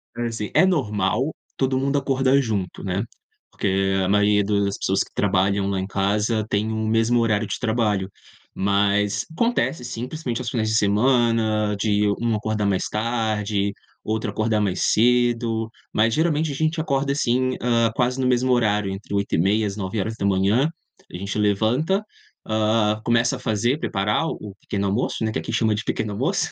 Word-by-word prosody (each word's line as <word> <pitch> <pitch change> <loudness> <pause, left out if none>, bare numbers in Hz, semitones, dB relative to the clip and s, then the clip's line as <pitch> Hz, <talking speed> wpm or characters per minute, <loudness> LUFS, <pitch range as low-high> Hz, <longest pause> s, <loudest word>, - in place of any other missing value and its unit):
Assim, 115 -3 -3
é - - +5
normal 130 - 0 0.2
todo 130 -1 +1
mundo 140 +1 0
acordar 135 0 +2
junto, 105 -8 -3
né, 95 +2 -1 0.5
porque 95 0 0
a - - 0
maioria 105 0 +3
das 100 -1 0
pessoas 95 +1 0
que - - -19
trabalham 100 0 +1
lá 100 -1 -1
em 95 - -3
casa 105 +3 0
tem 105 +2 0
o 110 0 -2
mesmo 115 +2 +2
horário 110 -2 +1
de 95 - -4
trabalho. 110 -5 0 0.5
Mas 100 +1 +1
acontece, 235 - 0
sim, 120 0 -5
principalmente 130 -7 -4
aos 120 - -3
finais 110 -3 -1
de 110 - 0
semana, 110 -1 +2
de 105 -1 +2
um 115 -2 +1
acordar 105 -1 -1
mais 95 -2 0
tarde, 105 -3 -1 0.3
outro 110 0 -2
acordar 110 +1 0
mais 100 -3 0
cedo. 115 -1 +2 0.2
Mas, 110 +1 +2
geralmente, 155 0 +1
a - - -5
gente 160 +2 0
acorda, 140 -3 0
assim, 130 -2 0
hã, 115 -2 +2
quase 125 +1 0
no 130 - +1
mesmo 125 0 +2
horário, 105 -5 +1
entre 95 +2 -8
8:30, 100 +2 +1
às 100 - -3
9:00. 100 +4 0 0.4
A - - -6
gente 100 +3 -5
levanta, 120 - +1 0.4
hã, 110 0 +1
começa 120 +3 +2
a - - -13
fazer 120 +5 0
preparar 105 +10 0
o 105 -9 -6
pequeno 100 0 -3
almoço, 110 +3 -1
né, 110 - 0
que - - -2
aqui - - -5
chama 110 -2 +2
de 105 - -3
pequeno 110 -1 -2
almoço, 165 - 0
110 Hz, 165 wpm, -23 LUFS, 100-125 Hz, 0.5 s, é